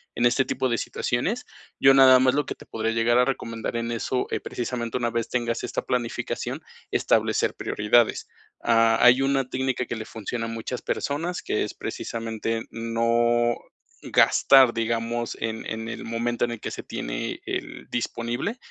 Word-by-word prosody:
en 120 Hz, -, +1 dB
este 125 Hz, +2 st, +4 dB
tipo 130 Hz, -, -1 dB
de 120 Hz, -, +1 dB
situaciones. 180 Hz, -, -2 dB, 0.3 s
Yo 135 Hz, -, +7 dB
nada 130 Hz, -1 st, +8 dB
más 130 Hz, 0 st, +4 dB
lo 145 Hz, 0 st, +1 dB
que -, -, -5 dB
te -, -, -15 dB
podría 110 Hz, 0 st, -2 dB
llegar 115 Hz, +1 st, +2 dB
a 125 Hz, -, +5 dB
recomendar 115 Hz, -4 st, -3 dB
en 115 Hz, 0 st, -2 dB
eso, 120 Hz, +2 st, -1 dB
eh, -, -, 0 dB
precisamente 120 Hz, -1 st, -3 dB
una 120 Hz, -2 st, -1 dB
vez 115 Hz, 0 st, -2 dB
tengas 120 Hz, -2 st, -1 dB
esta -, -, -3 dB
planificación, 120 Hz, -2 st, -3 dB, 0.3 s
establecer -, -, +2 dB
prioridades. 110 Hz, +2 st, +2 dB, 0.3 s
Ha 115 Hz, -1 st, +3 dB
hay 125 Hz, +2 st, +7 dB
una 135 Hz, -1 st, +1 dB
técnica 130 Hz, -1 st, -1 dB
que 115 Hz, -, -4 dB
le 110 Hz, -1 st, -6 dB
funciona 115 Hz, +1 st, -5 dB
a -, -, -4 dB
muchas 125 Hz, +2 st, -4 dB
personas, 165 Hz, +5 st, -2 dB
que -, -, 0 dB
es -, -, -5 dB
precisamente 115 Hz, 0 st, -4 dB
no 115 Hz, +1 st, +1 dB, 0.5 s
gastar, 135 Hz, -3 st, +5 dB
digamos, 115 Hz, +1 st, -2 dB
en 110 Hz, 0 st, -3 dB
en 110 Hz, 0 st, -4 dB
el 120 Hz, -, -6 dB
momento 120 Hz, +1 st, -1 dB
en 120 Hz, -, -5 dB
el 120 Hz, -, -5 dB
que -, -, -4 dB
se -, -, -6 dB
tiene -, -, -4 dB
el -, -, -5 dB
disponible, 120 Hz, -, -2 dB
120 Hz, 170 wpm, -25 LUFS, 115-125 Hz, 0.5 s, nada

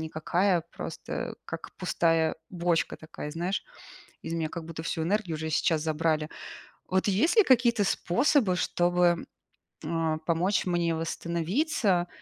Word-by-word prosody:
никакая, 170 Hz, +3 st, +1 dB
просто -, -, -5 dB
как -, -, -7 dB
пустая 165 Hz, -1 st, +1 dB
бочка 170 Hz, -2 st, 0 dB
такая, 155 Hz, -1 st, -8 dB
знаешь, 175 Hz, +5 st, -2 dB, 0.6 s
из 165 Hz, -, -4 dB
меня 160 Hz, -2 st, -1 dB
как 170 Hz, -2 st, -6 dB
будто 165 Hz, -1 st, -7 dB
всю 165 Hz, -1 st, -2 dB
энергию 185 Hz, -2 st, 0 dB
уже 160 Hz, +1 st, -4 dB
сейчас 155 Hz, 0 st, +2 dB
забрали. 155 Hz, 0 st, 0 dB, 0.6 s
Вот 190 Hz, +2 st, +1 dB
есть 210 Hz, -, +2 dB
ли 435 Hz, -, +9 dB
какие-то 240 Hz, -, +4 dB
способы, 220 Hz, -, +2 dB
чтобы, 175 Hz, -1 st, +2 dB, 0.6 s
а, 160 Hz, -1 st, 0 dB
помочь 175 Hz, +6 st, +1 dB
мне 170 Hz, -2 st, +1 dB
восстановиться 175 Hz, -, 0 dB
170 Hz, 130 wpm, -28 LUFS, 160-190 Hz, 0.6 s, ли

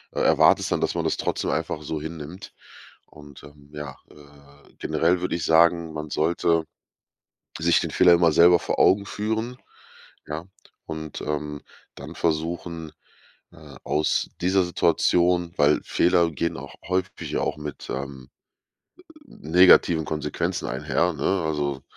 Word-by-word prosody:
e -, -, -1 dB
erwartest -, -, +4 dB
dann, -, -, 0 dB
dass -, -, -1 dB
man -, -, -1 dB
das -, -, 0 dB
trotzdem -, -, -2 dB
einfach 75 Hz, -, -3 dB
so 75 Hz, +1 st, -4 dB
hinnimmt. 80 Hz, +3 st, -8 dB, 0.5 s
Und, 75 Hz, -2 st, -15 dB
ähm, 70 Hz, -1 st, -16 dB
ja, 75 Hz, -2 st, -7 dB, 0.2 s
äh, 70 Hz, -1 st, -19 dB
generell 85 Hz, +3 st, +1 dB
würde 90 Hz, -, -2 dB
ich 80 Hz, -2 st, -3 dB
sagen, 85 Hz, 0 st, +3 dB
man 75 Hz, -1 st, -6 dB
sollte 85 Hz, +1 st, +1 dB, 0.9 s
sich 85 Hz, +1 st, +3 dB
den -, -, -3 dB
Fehler 90 Hz, -1 st, +5 dB
immer 85 Hz, -2 st, +3 dB
selber 85 Hz, +3 st, +6 dB
vor -, -, -3 dB
Augen 100 Hz, +1 st, +4 dB
führen, 110 Hz, +4 st, -3 dB, 0.7 s
ja, 75 Hz, +2 st, -5 dB, 0.4 s
und, 80 Hz, -1 st, -7 dB
ähm, 75 Hz, -1 st, -4 dB, 0.4 s
dann 75 Hz, +4 st, -9 dB
versuchen, 80 Hz, 0 st, -3 dB, 0.6 s
äh, 75 Hz, -5 st, -14 dB
aus 75 Hz, +1 st, 0 dB
dieser 95 Hz, +1 st, +2 dB
Situation 85 Hz, 0 st, +1 dB
weil 75 Hz, +1 st, +3 dB
Fehler 85 Hz, -1 st, +2 dB
gehen 85 Hz, +2 st, -3 dB
auch -, -, -10 dB
häufig 95 Hz, +1 st, -3 dB
auch -, -, -2 dB
mit, 75 Hz, -1 st, -8 dB
ähm, 65 Hz, -1 st, -6 dB, 1.0 s
negativen 85 Hz, -, +4 dB
Konsequenzen 75 Hz, -2 st, -3 dB
einher, 90 Hz, -, 0 dB
ne? 85 Hz, +5 st, -1 dB
Also, 70 Hz, -3 st, -2 dB
80 Hz, 135 wpm, -24 LUFS, 75-85 Hz, 1.0 s, selber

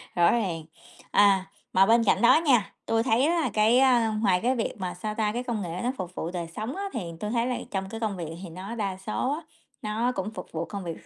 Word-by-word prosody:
Rõ 170 Hz, -1 st, +5 dB
ràng. 185 Hz, -9 st, -1 dB, 0.5 s
À, 195 Hz, -2 st, +5 dB, 0.3 s
mà 190 Hz, +1 st, +6 dB
bên 230 Hz, +2 st, +4 dB
cạnh 215 Hz, -, +2 dB
đó 270 Hz, +7 st, +6 dB
nha, 235 Hz, -8 st, +3 dB
tui 225 Hz, 0 st, +1 dB
thấy 250 Hz, +2 st, +3 dB
á 335 Hz, +2 st, +2 dB
là 260 Hz, -, 0 dB
cái, 220 Hz, +3 st, +4 dB
a, 245 Hz, -4 st, +4 dB
ngoài 185 Hz, -4 st, +3 dB
cái 255 Hz, +2 st, +2 dB
việc 230 Hz, -, -1 dB
mà, 185 Hz, -3 st, -3 dB
sao 210 Hz, +4 st, -5 dB
ta, 215 Hz, -1 st, +1 dB
cái 245 Hz, +2 st, -2 dB
công 235 Hz, -4 st, -2 dB
nghệ 175 Hz, -1 st, -4 dB
nó 245 Hz, -, +1 dB
phục 180 Hz, -1 st, -6 dB
vụ 165 Hz, -, -3 dB
đời 175 Hz, -2 st, -4 dB
sống 220 Hz, +6 st, -4 dB
á 395 Hz, -, -4 dB
thì 235 Hz, -, -2 dB, 0.2 s
tui 210 Hz, -, -3 dB
thấy 235 Hz, 0 st, +1 dB
là 250 Hz, -, -1 dB
trong 190 Hz, -1 st, -3 dB
cái 225 Hz, -, -6 dB
công 215 Hz, -4 st, -2 dB
việc 165 Hz, -2 st, -5 dB
thì 180 Hz, -, -7 dB
nó 190 Hz, +7 st, -7 dB
đa 195 Hz, -4 st, -2 dB
số 215 Hz, +7 st, -2 dB
á 315 Hz, -, -4 dB, 0.4 s
nó 220 Hz, +4 st, 0 dB
cũng 195 Hz, +3 st, -3 dB
phục 180 Hz, -4 st, -9 dB
vụ 165 Hz, +1 st, -3 dB
công 200 Hz, -2 st, -6 dB
việc 165 Hz, -2 st, -7 dB
215 Hz, 260 wpm, -27 LUFS, 185-235 Hz, 0.5 s, mà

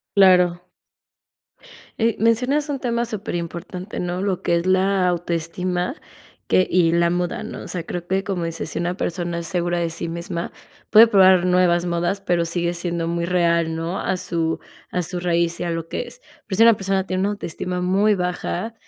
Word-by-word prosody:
Claro. 180 Hz, -3 st, +5 dB, 1.4 s
Eh, 230 Hz, -1 st, +2 dB
mencionas 250 Hz, +7 st, +2 dB
un 280 Hz, -2 st, -2 dB
tema 235 Hz, -2 st, -1 dB
superimportante, 180 Hz, -2 st, -5 dB
¿no? 180 Hz, +1 st, -2 dB
Lo 195 Hz, -2 st, -1 dB
que 170 Hz, -, +1 dB
es 170 Hz, +1 st, -1 dB
la 190 Hz, 0 st, +2 dB
autoestima 175 Hz, -, -2 dB, 0.5 s
que 185 Hz, -, +3 dB
y 175 Hz, -2 st, +3 dB
la 170 Hz, 0 st, +3 dB
moda, 175 Hz, 0 st, -2 dB
¿no? -, -, -7 dB
O -, -, -9 dB
sea, 175 Hz, -2 st, -4 dB
creo 175 Hz, 0 st, -5 dB
que 190 Hz, +1 st, 0 dB
como 185 Hz, -4 st, -2 dB
dices, 165 Hz, 0 st, -4 dB
si -, -, -3 dB
una 175 Hz, +1 st, -1 dB
persona 175 Hz, -2 st, -3 dB
es 170 Hz, -, -4 dB
segura 175 Hz, -1 st, -1 dB
de 170 Hz, -1 st, -1 dB
sí 165 Hz, +1 st, -3 dB
misma, 170 Hz, +1 st, -4 dB, 0.4 s
puede 225 Hz, +1 st, +9 dB
probar 190 Hz, -4 st, +5 dB
nuevas 180 Hz, -1 st, +3 dB
modas, 175 Hz, +3 st, -1 dB
pero 175 Hz, -3 st, 0 dB
sigue 170 Hz, +1 st, -1 dB
siendo 170 Hz, -1 st, -2 dB
muy 170 Hz, 0 st, -1 dB
real, 170 Hz, -2 st, +1 dB
¿no? 165 Hz, +3 st, -3 dB
A 185 Hz, -, -1 dB
su 165 Hz, -3 st, -1 dB, 0.3 s
a 180 Hz, -, -1 dB
su 180 Hz, +2 st, -2 dB
raíz 170 Hz, -1 st, 0 dB
y -, -, -2 dB
a -, -, -2 dB
lo 165 Hz, -1 st, -3 dB
que -, -, -3 dB
es, -, -, -10 dB, 0.3 s
pero 190 Hz, -3 st, -3 dB
si 225 Hz, -, +6 dB
una 230 Hz, 0 st, +8 dB
persona 195 Hz, -1 st, -1 dB
tiene 185 Hz, -1 st, -2 dB
una 200 Hz, -, +1 dB
autoestima 180 Hz, -2 st, -4 dB
muy 195 Hz, +4 st, +3 dB
baja, 180 Hz, +3 st, -3 dB
180 Hz, 190 wpm, -22 LUFS, 170-195 Hz, 1.4 s, puede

